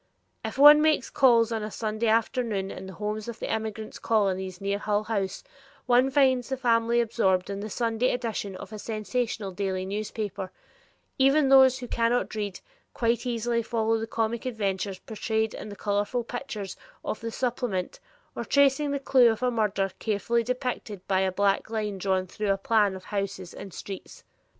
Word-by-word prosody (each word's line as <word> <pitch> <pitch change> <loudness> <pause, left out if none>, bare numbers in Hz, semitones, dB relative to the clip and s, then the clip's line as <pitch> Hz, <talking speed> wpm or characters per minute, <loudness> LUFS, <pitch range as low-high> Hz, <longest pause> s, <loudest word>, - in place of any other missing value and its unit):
If - - -5
one 295 +2 +9
makes 310 -4 +2
calls 235 -4 +4
on 225 -1 -1
a 210 - -4
Sunday 215 +1 -2
afternoon 220 -3 0
in 190 - -8
the 190 - -8
homes 210 +4 -4
of 235 -1 -6
the - - -3
immigrant 220 -1 -5
colonies 190 -4 0
near 200 0 -1
Hull 210 0 0
House, 200 -4 -2 0.4
one 250 +1 +4
finds 260 -2 +3
the 265 - -1
family 235 -2 +2
absorbed 200 -5 +1
in 200 - -4
the 215 +2 -5
Sunday 230 +2 0
edition 225 -5 -3
of 185 - -9
a 215 - -6
sensational 215 -1 -3
daily 190 -1 -2
newspaper, 205 -1 -4 0.7
even 275 +1 +4
those 265 -1 +7
who 250 -2 -7
cannot 235 +1 0
read, 205 -3 -4 0.3
quite 235 +1 0
easily 235 0 0
following 225 -1 0
the 225 - -3
comic 225 +2 -2
adventures 200 -4 -2
portrayed 220 +2 -2
in 215 - -7
the 205 - -8
colored 205 0 -1 0.2
pictures 235 -7 -5 0.3
of - - -3
the 230 - -4
supplement 235 -6 -2 0.4
or - - -3
tracing 280 +1 +3
the 280 0 -1
clew 260 -3 +5
of 225 +3 -4
a 250 - +2
murderer 205 -4 0
carefully 225 +2 0
depicted 240 -5 -4
by 190 -1 +2
a 190 0 +1
black 200 +2 +1
line 210 -3 -3
drawn 190 0 0
through 205 +3 -4
a 195 - +1
plan 205 -1 +2
of 185 - -9
the - - -16
houses 195 -3 -3
and 195 - -9
streets. 195 +2 -9
220 Hz, 180 wpm, -27 LUFS, 200-240 Hz, 0.7 s, one